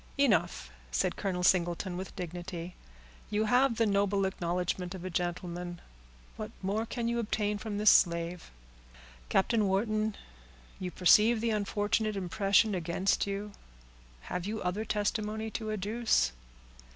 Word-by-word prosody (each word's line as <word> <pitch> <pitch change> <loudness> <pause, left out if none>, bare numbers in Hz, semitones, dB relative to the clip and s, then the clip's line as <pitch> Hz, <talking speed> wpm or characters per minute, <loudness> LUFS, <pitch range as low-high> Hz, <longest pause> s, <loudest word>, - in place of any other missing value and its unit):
"Enough," 180 - +2 0.2
said - - 0
Colonel 185 -3 -2
Singleton, 175 +1 +2
with 185 +1 -6
dignity. 175 -1 -6 0.6
"You 215 +1 +1
have 245 +2 +3
the 230 - +3
noble 200 -1 +2
acknowledgment 180 0 -2
of 185 -1 -8
a 185 - -4
gentleman, 175 0 -3 0.6
what 215 0 -5
more 210 +4 -1
can 235 0 -2
you 235 0 0
obtain 210 -2 -1
from 210 -2 -4
this 210 0 +6
slave?—Captain 60 - -1
Wharton, 215 +2 0 0.6
you 185 - -3
perceive 210 +6 +5
the 230 0 0
unfortunate 210 +1 0
impression 195 +3 +2
against 180 +3 0
you. 200 +1 -4 0.7
Have 180 - -4
you 220 +1 -3
other 185 +5 -1
testimony 215 +1 -1
to 220 0 -4
adduce?" 215 +3 +1
195 Hz, 125 wpm, -30 LUFS, 175-215 Hz, 0.7 s, this